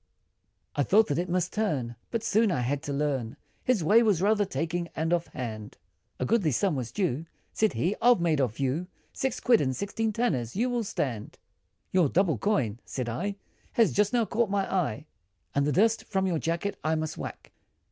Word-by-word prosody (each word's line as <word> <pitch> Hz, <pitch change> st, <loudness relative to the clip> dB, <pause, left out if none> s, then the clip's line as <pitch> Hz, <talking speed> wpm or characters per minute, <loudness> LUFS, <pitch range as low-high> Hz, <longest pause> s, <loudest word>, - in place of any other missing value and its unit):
I -, -, +1 dB
thought 210 Hz, +10 st, +5 dB
that 145 Hz, +2 st, 0 dB
it 180 Hz, +1 st, -2 dB
must 180 Hz, 0 st, 0 dB
turn, 140 Hz, -, -1 dB
But 230 Hz, -2 st, -2 dB
soon 220 Hz, -1 st, +3 dB
I 125 Hz, -, 0 dB
had 135 Hz, +3 st, -1 dB
to 145 Hz, -, -5 dB
learn, 140 Hz, -5 st, -1 dB, 0.3 s
His 245 Hz, -9 st, +2 dB
way 210 Hz, +8 st, +6 dB
was 210 Hz, -7 st, +3 dB
rather 205 Hz, +2 st, +3 dB
taking, 170 Hz, -2 st, -2 dB
and 160 Hz, +2 st, 0 dB
off 170 Hz, -1 st, 0 dB
hand, 110 Hz, -4 st, -6 dB, 0.4 s
A -, -, 0 dB
goodly 210 Hz, -8 st, +2 dB
sum 160 Hz, +6 st, +1 dB
was 125 Hz, -4 st, -4 dB
due, 165 Hz, -6 st, -1 dB, 0.3 s
Said 220 Hz, -1 st, +2 dB
he 185 Hz, +5 st, 0 dB
"I've 240 Hz, -2 st, +6 dB
made 160 Hz, -4 st, +2 dB
off 120 Hz, -2 st, -1 dB
you, 140 Hz, +7 st, -1 dB, 0.3 s
Six 265 Hz, -2 st, -2 dB
quid, 235 Hz, -3 st, +4 dB
and 130 Hz, -2 st, 0 dB
sixteen 220 Hz, -, -1 dB
tanners, 160 Hz, -, -1 dB
you 245 Hz, +5 st, +1 dB
will 240 Hz, -1 st, 0 dB
stand," 130 Hz, -, -3 dB, 0.5 s
"Your 180 Hz, -6 st, +3 dB
double 170 Hz, -, +2 dB
coin," 120 Hz, -, 0 dB
said 125 Hz, -3 st, -4 dB
I, 195 Hz, -, -2 dB, 0.4 s
"Has 230 Hz, -2 st, +3 dB
just 205 Hz, 0 st, +2 dB
now 240 Hz, -2 st, +2 dB
caught 225 Hz, 0 st, 0 dB
my 200 Hz, -1 st, +1 dB
eye, 155 Hz, -, -1 dB, 0.5 s
And 140 Hz, 0 st, +2 dB
the -, -, +2 dB
dust, 220 Hz, +7 st, +2 dB
from 190 Hz, -2 st, 0 dB
your 175 Hz, -4 st, 0 dB
jacket, 170 Hz, +6 st, -2 dB
I 155 Hz, +1 st, +1 dB
must 155 Hz, -1 st, -3 dB
whack!" -, -, -7 dB
175 Hz, 200 wpm, -28 LUFS, 140-210 Hz, 0.5 s, way